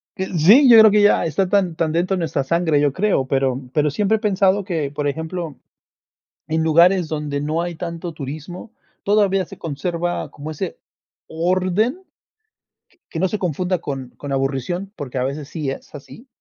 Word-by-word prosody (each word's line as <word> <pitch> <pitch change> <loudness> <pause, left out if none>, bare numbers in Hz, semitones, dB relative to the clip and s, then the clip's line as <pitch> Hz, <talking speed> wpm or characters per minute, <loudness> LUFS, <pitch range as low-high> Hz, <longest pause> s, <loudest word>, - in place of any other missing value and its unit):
Eh, 190 -1 -3
sí, 230 - +7
yo 230 -2 +9
creo 220 -1 +8
que 210 0 +4
ya 205 - +4
está 185 +4 0
tan 185 -4 +1
tan 160 -1 0
dentro 175 +4 0
de - - -3
nuestra 155 -4 -1
sangre, 165 0 +1
yo 145 -1 +2
creo, 190 -8 +1
pero 135 -1 0
pero, 150 -1 +2
siempre 210 +7 +1
he - - -9
pensado 200 -2 +2
que, 160 -7 -3
por 145 0 -2
ejemplo, 160 +1 -4 0.9
en 160 +1 0
lugares 170 +2 +4
donde 150 -2 -3
no 155 +3 -1
hay 175 -1 -4
tanto 170 0 -6
turismo, 155 - -8 0.3
todavía 200 -2 +2
se - - -13
conserva 170 +3 -3
como 150 +2 -8
ese 165 +3 -5 0.5
orden. 185 - 0 1.1
Que - - -6
no 190 - +2
se 210 - -3
confunda 180 +1 -1
con 135 -5 -5
con 145 - -7
la 135 - -1
aburrición, 140 +9 -2
porque, 135 -2 -7
a 125 - 0
veces 140 +1 -4
sí 150 -5 -3
es 135 - -9
así. 185 - -12
170 Hz, 185 wpm, -20 LUFS, 145-190 Hz, 1.1 s, yo